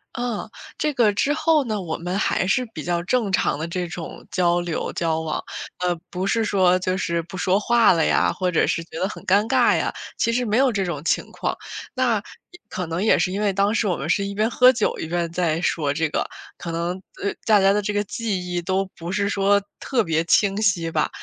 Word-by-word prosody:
嗯， 240 -3 -3 0.3
这 300 -1 0
个 235 -6 +3
之 280 +8 +1
后 310 -1 +3
呢， 215 -4 -2
我 160 -3 -4
们 180 +3 -3
还 195 - +1
是 255 +6 +1
比 155 - -6
较 175 -1 0
正 215 +1 0
常 190 - +1
地 155 - -3
这 175 +1 -3
种 170 -1 -8
交 175 -1 +2
流、 175 -2 -3
交 160 -1 -1
往。 160 -1 -3 0.4
呃， 180 -1 0
不 185 +2 -3
是 225 +3 +1
说 185 -4 +3
就 185 0 -1
是 170 -3 -1
不 170 +3 -9
说 185 +1 +2
话 235 +1 +4
了 165 -2 +2
呀， - - +3
或 185 -1 -1
者 165 - +2
是 165 - -1
觉 165 0 -9
得 190 - +1
很 205 - -9
尴 200 +3 +3
尬 - - +4
呀， - - 0 0.2
其 230 - +1
实 245 +1 0
没 215 0 +1
有 265 +1 +4
这 205 -5 -1
种 170 -6 -3
情 - - 0
况。 - - -2 0.4
那 255 -3 +2 0.3
也 355 - -15
可 180 - -4
能 165 +2 -2
也 215 - +4
是 185 - 0
因 195 - -2
为 205 -2 +1
当 200 +2 +2
时 225 -2 +1
我 180 - +1
们 155 - -5
是 200 +3 +2
一 200 0 -5
边 215 +2 +1
喝 250 +1 +6
酒 230 -4 0
一 - - -4
边 170 0 -2
在 170 -2 0
说 150 -5 0
这 160 +1 0
个， - - -1 0.3
可 170 - -6
能， 175 +3 -2 0.2
呃， 200 - +1
大 210 -3 +5
家 195 0 +5
的 210 +1 +2
这 205 +1 -2
个 205 0 +1
记 200 -4 -3
忆 175 - 0
都 190 +2 0
不 170 +2 -5
是 200 0 0
说 200 0 +3 0.2
特 250 -4 0
别 160 -3 +1
清 200 +3 +3
晰 175 -6 +1
吧。 155 -1 +1
190 Hz, 255 characters per minute, -23 LUFS, 170-215 Hz, 0.4 s, 喝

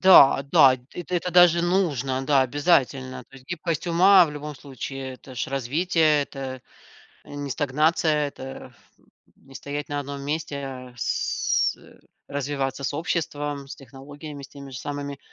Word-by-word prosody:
Да 160 -8 +8
да. 130 -1 +7 0.2
Это 175 +1 -5
это 180 +1 -1
даже 175 -1 +6
нужно, 140 -8 0
да, 140 0 +4
обязательно. 130 -2 +1
То - - -19
есть 130 -1 -17
гибкость 170 -1 -3
ума 180 +2 +6
в 160 - -5
любом 150 0 -7
случае- 135 -1 -7
это 130 +1 -13
ж 120 - -2
развитие, 150 +4 +2
это 135 -2 -7 0.6
не 145 -1 -6
стагнация, 150 +2 +1
это 135 -1 -9
аф - - -19 0.6
не 135 0 -19
стоять 145 +1 -5
на 145 - -2
одном 140 0 -5
месте, 150 0 -3
а 130 -2 -8
с 120 - 0
э, - - -18 0.3
развиваться 140 -1 -3
с 145 - -2
обществом, 145 -3 -3
с 135 - -8
технологиями, 140 +2 -10
с - - -10
теми 140 -1 -11
же 125 - -7
самыми. 140 0 -5
145 Hz, 155 wpm, -24 LUFS, 135-155 Hz, 0.6 s, Да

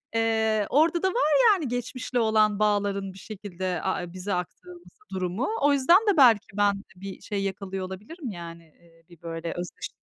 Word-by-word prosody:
Eee, 220 -2 +1
orada 325 +5 +3
da - - +4
var 375 -7 +1 0.2
yani 325 -9 -2
geçmişle 245 +1 -3
olan 215 -2 +3
bağların 200 -2 0
bir - - -14
şekilde 185 -4 -5
a 190 -1 -1
e 175 0 -9
bize 185 +2 -4
aktarılması 345 - -6 0.2
durumu. 185 +6 -2
O 285 0 +4
yüzden 280 +7 +6
de 390 -5 +3
belki 235 -6 +6
ben 200 -1 +2
bir 190 +1 -9
şey 200 -2 -3
yakalıyor 195 -1 -4
olabilirim 220 - -7
yani, 170 -2 -9
eee, 165 +1 -25
bir 170 -2 -17
böyle 165 0 -5
özdeş 175 0 -6
205 Hz, 175 wpm, -26 LUFS, 185-245 Hz, 0.2 s, yüzden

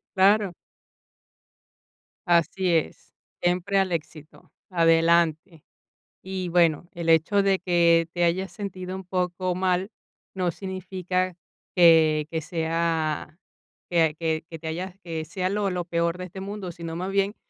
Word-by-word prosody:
claro. 195 -1 +4 1.7
Así 175 +2 +2
es, 160 - -4 0.3
siempre 180 +3 +1
al 190 -2 +1
éxito, 155 -1 -7 0.2
adelante. 165 -1 +2 0.6
Y, 185 -1 -4
bueno, 170 -1 +2
el 170 -1 -3
hecho 165 +6 +4
de 195 -1 +2
que 170 -2 +3
te 175 -1 0
hayas 185 +3 0
sentido 185 -2 -6
un 190 - -7
poco 180 0 -2
mal 185 +2 0 0.4
no 180 -2 0
significa 185 -1 -3 0.4
que 160 -3 +5
que 160 -1 -2
sea 160 -1 -2 0.5
que 165 -3 +3
que 160 -1 -1
que 165 -1 -8
te 160 - -7
hayas 180 +3 -4
que 165 -2 -4
sea 185 +3 -2
lo 200 0 0
lo 180 -2 -3
peor 170 0 0
de 180 - -6
este 185 +2 -9
mundo, 195 -2 -5
sino 165 -1 -7
más 185 +3 -3
bien 200 +1 +1
175 Hz, 135 wpm, -25 LUFS, 165-185 Hz, 1.7 s, que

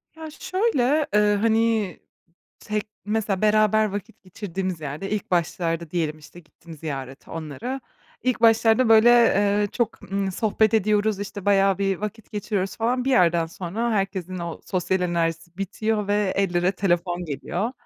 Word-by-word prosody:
Ya, 320 -1 -8
şöyle, 310 - +1
eee, 210 0 +4
hani, 220 -2 +1 0.6
tek, 210 0 -3 0.2
mesela, 210 -2 -1
beraber 215 0 +4
vakit 205 +3 -7
geçirdiğimiz 185 -2 -5
yerde 150 +6 -5
ilk 210 -2 -3
başlarda 170 -2 -1
diyelim, 155 -3 -2
işte, 155 +3 -14
gittim 165 0 -14
ziyarete 135 -4 -7
onlara. 165 - -5 0.4
İlk 255 -2 0
başlarda 225 +1 +4
böyle, 225 +1 +7
eee, 205 -3 +4
çok, 235 -3 -2
ımm, 195 -1 -1
sohbet 220 +2 +1
ediyoruz, 210 -1 +2
işte, 200 -1 -6
bayağı 195 -1 +3
bir 195 -1 0
vakit 210 +3 -7
geçiriyoruz 200 -2 -2
falan. 245 +2 0
Bir 270 - 0
yerden 170 -7 +3
sonra 190 +8 -3
herkesin 190 -3 -2
o 170 -1 -5
sosyal 185 0 -1
enerjisi 170 -1 -2
bitiyor 210 +2 -1
ve 205 -2 +1
ellere 180 -1 +1
telefon 175 -2 0
geliyor 175 - -3
200 Hz, 145 wpm, -24 LUFS, 175-220 Hz, 0.6 s, böyle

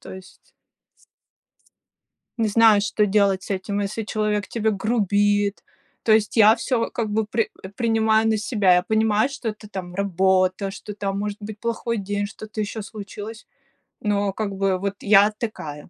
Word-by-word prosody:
То - - -10
есть 190 0 -15 1.8
Не 225 - +1
знаю, 215 -1 +5
что 210 0 +1
делать 195 -2 +2
с - - -11
этим, 200 +2 -2
если 215 +3 -3
человек 210 -2 -1
тебе 220 -1 0
грубит. 205 -1 +1 0.4
То 220 - +2
есть 215 -1 +2
я 215 +1 +7
всё 240 -1 -1
как 230 -2 -2
бы 215 +1 0
при 220 +1 -1 0.3
принимаю 225 -2 +2
на 220 -1 +2
себя, 205 -4 +2
я 180 - +3
понимаю, 220 +2 +2
что 260 -5 -4
это 210 0 -9
там 180 -3 -7
работа, 190 0 +1
что 210 +1 -8
там 195 -1 -3
может 205 0 -3
быть 210 0 -8
плохой 230 0 -2
день, 205 0 -2
что-то 215 +1 -9
еще 210 +1 -4
случилось, 215 +1 -9 0.6
но 205 -1 0
как 210 -1 -3
бы 195 -1 +1
вот 200 +1 -2
я 205 0 +5
такая. 155 -10 -6
210 Hz, 160 wpm, -23 LUFS, 200-220 Hz, 1.8 s, я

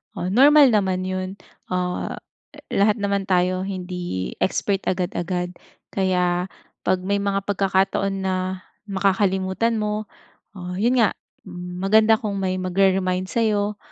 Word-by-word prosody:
Oh, 180 - -3
normal 280 +3 +7
naman 190 -3 +1
yun. 185 0 -3 0.4
Ah, 180 -1 -2 0.4
eh, - - -14 0.2
lahat 205 +1 +4
naman 200 -1 -1
tayo 185 0 +1
hindi 180 - -4
expert 195 +1 0
agad-agad. 180 -1 -1 0.4
Kaya 180 -2 +1 0.4
pag 185 0 +2
may 200 +2 0
mga 200 -1 -1
pagkakataon 195 0 0
na 190 -1 0 0.5
makakalimutan 195 +2 +1
mo, 210 0 -2 0.5
ah, 180 -1 -6
yun 235 +7 +2
nga, 225 - +3 0.3
m 180 -1 -7
maganda 215 +3 +4
kung 210 -3 -3
may 185 -1 -1
magre-remind 185 0 +1
sayo 210 -2 0
190 Hz, 125 wpm, -22 LUFS, 185-205 Hz, 0.5 s, normal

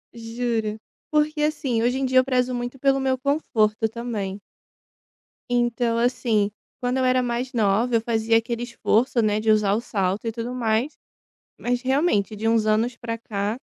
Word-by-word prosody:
Juro. 225 -2 -2 0.3
Porque 300 0 +1
assim, 275 -6 0
hoje 250 +3 +1
em 270 - 0
dia 260 0 +2
eu 255 - +2
prezo 255 -1 +1
muito 245 +2 -5
pelo 275 0 +3
meu 265 -1 +1
conforto, 225 -6 +1
também. 215 -4 -4 1.1
Então, 240 -1 +1
assim, 230 -4 +1 0.3
quando 250 +1 0
eu 260 - +1
era 255 0 +3
mais 245 +1 -2
nova 225 +2 +2
eu 225 - +3
fazia 225 0 +2
aquele 235 +1 -2
esforço, 240 0 +1
né, 210 -1 +1
de 220 0 +2
usar 210 -2 +3
o 220 - 0
salto 195 -2 -2
e - - 0
tudo 235 +2 -5
mais. 240 +3 0 0.7
Mas, 245 0 -1
realmente, 260 - +1
de 220 +2 -1
uns 225 -1 +2
anos 225 +3 +1
para 230 -2 -4
cá, 210 -1 -3
235 Hz, 170 wpm, -24 LUFS, 220-255 Hz, 1.1 s, pelo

